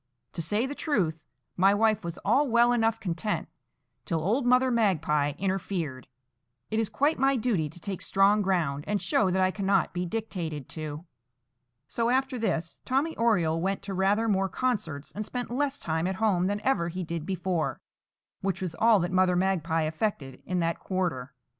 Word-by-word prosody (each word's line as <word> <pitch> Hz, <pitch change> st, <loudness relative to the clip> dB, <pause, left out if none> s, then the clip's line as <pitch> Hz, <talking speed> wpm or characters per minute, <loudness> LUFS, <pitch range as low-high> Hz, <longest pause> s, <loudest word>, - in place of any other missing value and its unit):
To 170 Hz, -, -3 dB
say 210 Hz, +9 st, 0 dB
the 275 Hz, -, -4 dB
truth, 175 Hz, -, -1 dB, 0.3 s
my 195 Hz, +2 st, +4 dB
wife 220 Hz, 0 st, +2 dB
was 170 Hz, 0 st, -5 dB
all 265 Hz, +8 st, +3 dB
well 235 Hz, +1 st, +5 dB
enough 225 Hz, -2 st, +2 dB
content 185 Hz, +3 st, -2 dB, 0.6 s
till 165 Hz, -3 st, -1 dB
old 225 Hz, -, 0 dB
Mother 250 Hz, +1 st, +4 dB
Magpie 155 Hz, -10 st, +2 dB
interfered. 185 Hz, -8 st, -3 dB, 0.6 s
It 220 Hz, -, +1 dB
is 225 Hz, -, 0 dB
quite 290 Hz, +3 st, +1 dB
my 270 Hz, +1 st, +3 dB
duty 215 Hz, -, 0 dB
to 175 Hz, -, -13 dB
take 190 Hz, +1 st, -5 dB
strong 200 Hz, +2 st, +3 dB
ground, 165 Hz, -8 st, 0 dB
and 205 Hz, 0 st, 0 dB
show 195 Hz, -1 st, +1 dB
that 185 Hz, +1 st, +2 dB
I 185 Hz, -, +3 dB
cannot 195 Hz, -1 st, +1 dB
be 180 Hz, 0 st, -2 dB
dictated 170 Hz, -, -4 dB
to." 155 Hz, 0 st, -6 dB, 0.8 s
So, 230 Hz, +11 st, 0 dB
after 260 Hz, 0 st, +1 dB
this, 170 Hz, -6 st, -2 dB
Tommy 280 Hz, +5 st, 0 dB
Oriole 170 Hz, -9 st, +2 dB
went 195 Hz, +2 st, -1 dB
to 195 Hz, 0 st, -5 dB
rather 200 Hz, +4 st, +2 dB
more 195 Hz, -2 st, +1 dB
concerts, 175 Hz, -, -2 dB
and 210 Hz, -, -4 dB
spent 245 Hz, +2 st, -5 dB
less 280 Hz, +2 st, 0 dB
time 160 Hz, -, -1 dB
at 190 Hz, -, -2 dB
home 185 Hz, -4 st, +2 dB
than 205 Hz, +1 st, -1 dB
ever 260 Hz, -10 st, +1 dB
he 180 Hz, +2 st, -4 dB
did 165 Hz, -1 st, -4 dB
before, 180 Hz, -2 st, -2 dB, 0.6 s
which 190 Hz, -1 st, -1 dB
was 180 Hz, -3 st, -3 dB
all 225 Hz, -1 st, +6 dB
that 175 Hz, +1 st, -2 dB
Mother 185 Hz, -1 st, +3 dB
Magpie 175 Hz, -3 st, +1 dB
effected 155 Hz, -, -3 dB
in 180 Hz, -, -1 dB
that 165 Hz, 0 st, -1 dB
quarter. 165 Hz, -9 st, -3 dB
190 Hz, 180 wpm, -28 LUFS, 165-225 Hz, 0.8 s, all